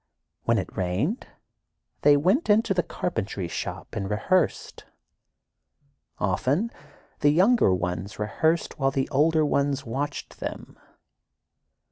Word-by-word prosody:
When 115 0 +3
it 95 -3 -4
rained, 95 - -1 0.7
they 145 -1 +6
went 190 - +2
into 210 0 +4
the 180 - +2
carpentry 105 - -3
shop - - -6
and 95 -1 -3
rehearsed. 165 - 0 1.3
Often, 130 - 0 0.5
the 145 - +4
younger 190 - +4
ones 90 +2 -2
rehearsed 160 +11 0
while 135 -1 +3
the 135 -1 -1
older 155 +3 +3
ones 140 -1 0
watched 135 +5 -4
them. - - -7
140 Hz, 110 wpm, -26 LUFS, 100-170 Hz, 1.3 s, they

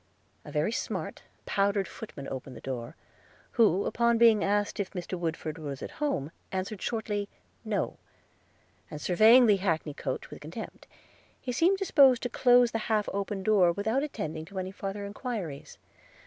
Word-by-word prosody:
A - - -10
very - - 0
smart - - -4 0.2
powdered 200 0 +1
footman 140 -11 -9
opened 130 -1 -6
the - - -9
door, 130 +2 -5 0.6
who, 205 -5 +3
upon 235 0 +2
being 225 -3 +6
asked 205 +1 0
if 200 - -1
Mr. 180 -1 -6
Woodford 165 -2 -4
was 140 -3 -6
at - - -6
home, 165 - -1 0.2
answered 190 +2 -3
shortly, 210 -3 -2 0.3
No; - - -2 0.9
and 150 - -7
surveying 220 - +6
the 210 -3 +5
hackney 165 -5 -1
coach - - -5
with - - -9
contempt, - - -8 0.6
seemed 345 +10 +3
disposed 280 - +5
to 245 - -1
close 245 0 +5
the 225 - -1
half 215 -2 +2
opened 200 -1 -3
door, 195 -5 +5
without 220 +8 0
attending 160 - -4
to 195 +3 -11
any 185 0 -3
farther 195 +1 -5
enquiries. 200 - -5
200 Hz, 155 wpm, -29 LUFS, 170-230 Hz, 0.9 s, being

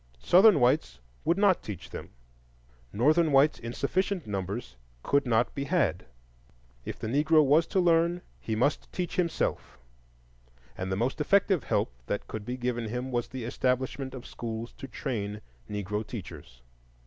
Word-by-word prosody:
Southern 185 - +6
whites 65 - +2 0.2
would 170 - +2
not 200 -3 +4
teach 100 -6 -8
them; - - -7 0.8
Northern 155 +9 +3
whites 140 +2 +4
in 115 - -6
sufficient 190 +5 -1
numbers 100 - -4 0.3
could 140 -2 +2
not 115 0 +2
be 140 - -3
had. 150 - 0 0.8
If - - -5
the - - -6
Negro 150 +6 +4
was 150 +4 +4
to 190 - +1
learn, 170 0 +3 0.2
he 110 - -3
must 130 +6 0
teach 180 -2 -3
himself, 175 -2 -1 1.0
and 95 0 -4
the - - +1
most 120 +8 -1
effective 195 0 +3
help - - 0
that - - -3
could 110 0 -6
be 125 +1 -3
given 120 -3 -2
him 125 +3 -4
was 120 -1 -1
the 130 -2 -6
establishment 130 +2 -1
of 125 - -9
schools 115 0 -6
to 135 - -6
train 115 -4 -4 0.3
Negro 105 +1 -3
teachers. 75 - -9
125 Hz, 155 wpm, -28 LUFS, 110-155 Hz, 1.0 s, Southern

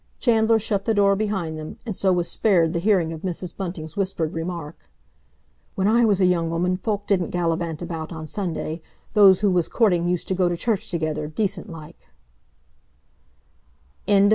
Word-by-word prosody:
Chandler 225 -2 +3
shut 205 -2 -1
the 225 - +1
door 200 -1 +4
behind 190 -7 -2
them, 155 - -8
and 215 -5 -4
so 190 +1 +2
was 175 -1 +1
spared 175 -6 +2
the 170 - 0
hearing 175 -4 +2
of 160 - -8
Mrs. 180 -1 -4
Bunting's 170 -4 -6
whispered 185 -5 -2
remark: 165 -2 -6 0.9
"When 190 +1 +1
I 235 +2 +4
was 205 -3 +2
a 185 - +4
young 170 -2 +1
woman 180 +2 0
folk 205 +1 -3
didn't 185 -4 +1
gallivant 170 -1 -2
about 165 -2 -5
on 160 -1 -6
Sunday; 165 -2 -4 0.3
those 195 -3 +6
who 205 -2 +3
was 175 -2 +1
courting 180 -7 +2
used 180 -1 -1
to - - +1
go 180 -1 +2
to 175 - -2
church 220 -1 -1
together, 155 -3 -2
decent 195 +4 -2
like—" 160 -3 -12 2.0
CHAPTER 205 - +3
XXV. 200 0 +5
180 Hz, 180 wpm, -23 LUFS, 165-200 Hz, 2.0 s, those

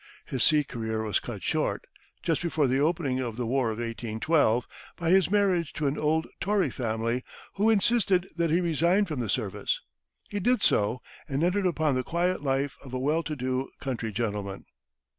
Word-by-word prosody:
His 130 -3 0
sea 150 -1 +5
career 110 -4 -3
was 105 -3 +1
cut - - -7
short, - - -1 0.4
just 165 -3 +1
before 160 -4 +1
the 130 +1 +2
opening 145 -4 +1
of 120 -4 -3
the 125 - -1
war 125 0 +1
of 110 - -3
1812, 115 +2 +1 0.3
by 170 -1 0
his 190 -2 +5
marriage 190 -5 +2
into 155 - -2
an 140 +1 0
old 160 +1 +1
Tory 195 -8 +1
family, 115 +1 -1 0.3
who 210 +3 +2
insisted 200 -4 +3
that 170 -1 +1
he 170 +4 +3
resign 170 +4 +2
from 155 -8 -4
the 115 -4 -2
service. 105 -2 -1 0.5
He 205 - -3
did 245 +5 +2
so, 105 +5 +2 0.3
and 140 +3 0
entered 185 +2 +2
upon 160 -4 +1
the 130 - +1
quiet 175 +3 0
life 135 0 -1
of 130 -2 -7
a - - -1
well 150 +5 +1
to 155 -2 -4
do 130 0 -2
country 115 -5 -3
gentleman. 105 -3 -3
145 Hz, 185 wpm, -28 LUFS, 120-170 Hz, 0.5 s, sea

